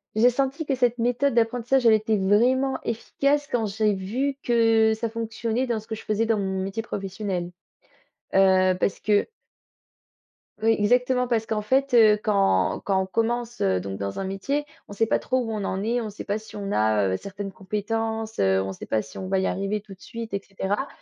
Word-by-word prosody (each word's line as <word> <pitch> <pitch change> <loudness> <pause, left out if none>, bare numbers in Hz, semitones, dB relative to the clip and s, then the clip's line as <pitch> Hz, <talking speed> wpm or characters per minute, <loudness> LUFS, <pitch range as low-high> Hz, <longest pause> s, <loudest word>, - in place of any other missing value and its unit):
J'ai 230 +3 +5
senti 275 +5 -1
que 275 - 0
cette 245 -1 +1
méthode 245 +3 +1
d'apprentissage, 240 +2 +1
elle 225 - +7
était 215 0 +2
vraiment 245 +8 +2
efficace 280 +5 0
quand 235 -2 0
j'ai 210 +1 +1
vu 240 +9 -2
que 225 -2 +4
ça 225 +1 -3
fonctionnait 230 +2 -2
dans 235 -2 -1
ce 215 - -15
que 220 - -4
je 220 - -10
faisais 215 +1 0
dans 225 -1 +1
mon 190 -1 -2
métier 205 +3 -4
professionnel. 195 -3 -4 0.9
Heu, 185 -1 +5
parce 190 - -1
que 205 -1 +2 1.4
oui, 225 +1 +4
exactement 250 +4 +2
parce 225 -2 0
qu'en 215 -1 -1
fait, 265 +4 +1
heu, 215 -2 +6
quand 95 - +2
quand 190 -1 +2
on 190 - -1
commence, 235 +4 -1
heu 95 -1 +2
donc 95 +1 -5
dans 100 0 -4
un 195 - -2
métier, 275 +10 -2 0.2
on - - -9
sait 225 +2 +1
pas - - +2
trop 260 - -1
où 230 -3 -3
on 210 -2 -3
en 190 0 -2
est, 240 +2 0
on 220 - -4
sait 205 - -8
pas 205 - -1
si 220 0 -12
on 200 -1 -4
a, 110 - +2
heu, - - 0
certaines 200 - -7
compétences, 220 +3 -3
heu, 95 0 +3
on 95 0 -3
sait 95 - -8
pas 110 - 0
si 140 - -12
on 185 - -5
va 190 0 +1
y 190 - 0
arriver 195 +2 -2
tout 200 -1 -12
de 185 - -31
suite 230 -2 -7
et 195 - -2
cetera. 200 +6 -2
220 Hz, 210 wpm, -25 LUFS, 195-235 Hz, 1.4 s, elle